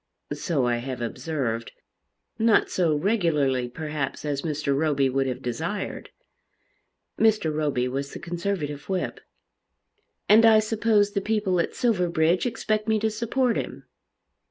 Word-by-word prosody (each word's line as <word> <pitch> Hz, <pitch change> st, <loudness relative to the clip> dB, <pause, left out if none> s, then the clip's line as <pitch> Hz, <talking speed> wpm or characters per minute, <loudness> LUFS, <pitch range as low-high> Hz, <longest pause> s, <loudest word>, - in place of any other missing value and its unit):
"So 150 Hz, -8 st, -1 dB
I 120 Hz, -1 st, +1 dB
have 125 Hz, +1 st, -5 dB
observed, 120 Hz, -1 st, -3 dB, 0.7 s
not 225 Hz, -1 st, +3 dB
so 165 Hz, -4 st, +2 dB
regularly 150 Hz, -, +1 dB
perhaps 150 Hz, +1 st, -4 dB
as 145 Hz, -2 st, -1 dB
Mr. 150 Hz, -3 st, -1 dB
Roby 140 Hz, -3 st, +1 dB
would 135 Hz, +1 st, +1 dB
have 125 Hz, -, -4 dB
desired." 160 Hz, -, -4 dB, 1.1 s
Mr. 215 Hz, -8 st, +3 dB
Roby 145 Hz, -5 st, 0 dB
was 140 Hz, +2 st, -3 dB
the -, -, -7 dB
Conservative 170 Hz, -4 st, -4 dB
whip. 185 Hz, -2 st, -2 dB, 1.1 s
"And 220 Hz, +2 st, +7 dB
I 225 Hz, -1 st, +7 dB
suppose 215 Hz, -1 st, +2 dB
the 200 Hz, -, -1 dB
people 205 Hz, -4 st, 0 dB
at 170 Hz, -, -1 dB
Silverbridge 180 Hz, -4 st, +2 dB
expect 215 Hz, -2 st, -1 dB
me 220 Hz, 0 st, +3 dB
to 220 Hz, +1 st, 0 dB
support 235 Hz, +2 st, 0 dB
him." -, -, -5 dB
165 Hz, 130 wpm, -25 LUFS, 140-210 Hz, 1.1 s, And